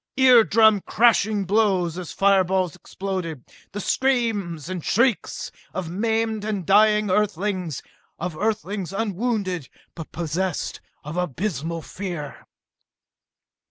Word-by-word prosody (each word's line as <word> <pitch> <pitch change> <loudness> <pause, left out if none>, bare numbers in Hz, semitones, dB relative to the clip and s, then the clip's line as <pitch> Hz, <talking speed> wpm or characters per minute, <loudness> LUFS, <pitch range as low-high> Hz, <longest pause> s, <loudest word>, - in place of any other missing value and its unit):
Ear 255 -3 +7
drum 220 -2 +5
crashing 215 -2 +3
blows 190 -4 +2
as 180 - -7
fireballs 190 -3 +2
exploded. 180 -8 -5 0.3
The 205 - -5
screams 210 - 0
and 185 -3 -4
shrieks 235 0 0 0.2
of 175 -3 -3
maimed 220 +2 0
and 205 -4 -3
dying 210 +1 +4
Earthlings 185 - -1 0.3
of 175 -1 -4
Earthlings 205 -2 -2
unwounded 200 - -2 0.2
but 165 -3 -9
possessed 175 +1 -3 0.2
of 150 +4 -6
abysmal 170 -1 -2
fear.... 175 -7 -6
195 Hz, 105 wpm, -23 LUFS, 175-215 Hz, 0.3 s, Ear